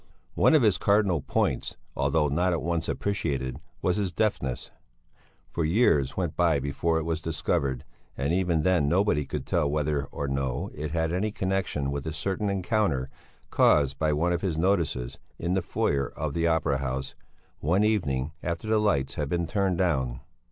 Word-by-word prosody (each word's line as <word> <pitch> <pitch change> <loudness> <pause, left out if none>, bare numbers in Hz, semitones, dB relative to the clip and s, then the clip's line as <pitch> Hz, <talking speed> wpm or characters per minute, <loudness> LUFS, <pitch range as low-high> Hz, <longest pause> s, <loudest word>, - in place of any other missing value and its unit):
One - - +4
of 150 - +5
his 105 -4 +3
cardinal 100 -6 +2
points, - - -1 0.2
although 70 +2 +2
not 85 +5 +1
at 85 - -2
once 85 0 -1
appreciated, 70 -10 -2 0.2
was 90 +2 +2
his 100 -3 -1
deafness. 85 - -1 0.8
Several 85 - -1
years 80 - +2
went 90 -4 -1
by 85 -4 +3
before 70 +4 0
it 80 - -1
was 80 0 -2
discovered, 70 -5 -1 0.3
and 70 +5 0
even 90 -4 +1
then 85 -5 +3
nobody 85 -5 +2
could - - -4
tell 75 - +1
whether 75 -1 0
or 70 - -5
no 70 -2 -2
it 75 +1 -4
had 80 +1 -1
any 105 +4 0
connexion 95 -8 -1
with 70 +2 -4
a 80 - -3
certain 95 +5 -1
encounter, 95 - 0 0.4
caused 70 -3 +3
by 80 -1 +2
one 85 +4 +1
of 85 - -1
his 90 -5 -1
notices, 80 -9 0 0.2
in 85 +2 -1
the 95 - +1
foyer 70 -4 0
of 75 -2 -4
the 85 +1 +1
Opera 80 -4 +1
House, 65 0 -3 0.5
one 90 +8 +2
evening 80 -11 0
after 85 +5 -3
the 110 0 +3
lights 70 -10 +1
had 75 -2 -3
been 85 +1 0
turned 95 +2 0
down. 65 -9 0
80 Hz, 175 wpm, -27 LUFS, 70-95 Hz, 0.8 s, of